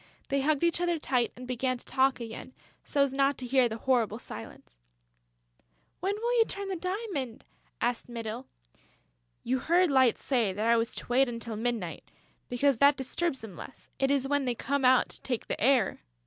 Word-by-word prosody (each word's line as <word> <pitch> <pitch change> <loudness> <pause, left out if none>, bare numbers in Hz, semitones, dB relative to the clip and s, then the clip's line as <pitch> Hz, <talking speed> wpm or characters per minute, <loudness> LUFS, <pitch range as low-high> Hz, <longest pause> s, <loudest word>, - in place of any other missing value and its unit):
They 275 0 +1
hugged 300 +2 +1
each 340 0 +2
other 345 -1 +1
tight 250 -5 0
and 250 +1 -9
began 255 +1 -1
to - - -12
talk 265 0 +2
again, 230 +2 -8 0.3
so 280 - +2
as 275 -1 -1
not 275 0 +2
to 255 - -6
hear 255 -1 +3
the 220 - -4
horrible 230 -4 +1
silence: 110 - -11 1.2
"When 390 +3 -1
will 475 +3 0
you 450 - +6
turn 400 0 -4
the 380 - -1
diamond?" 365 - -4 0.3
asked 240 0 -1
Mytyl. 230 +1 -5 1.0
"You 255 +2 0
heard 345 +4 +3
Light 260 -3 +4
say 235 -8 0
that 210 +3 -2
I 235 +1 +5
was 230 0 0
to - - -6
wait 255 +2 +3
until 230 -1 -5
midnight, 220 -6 -3 0.4
because 260 +1 +2
that 280 +3 +5
disturbs 270 +2 -2
them 215 -5 -9
less; 265 - -11
it 270 - +2
is 275 -1 +2
when 285 -1 +1
they 245 -1 0
come 280 +3 -1
out 255 0 +5
to - - -5
take 245 -4 -3
the - - -4
air...." 250 -3 +3
260 Hz, 190 wpm, -29 LUFS, 235-280 Hz, 1.2 s, you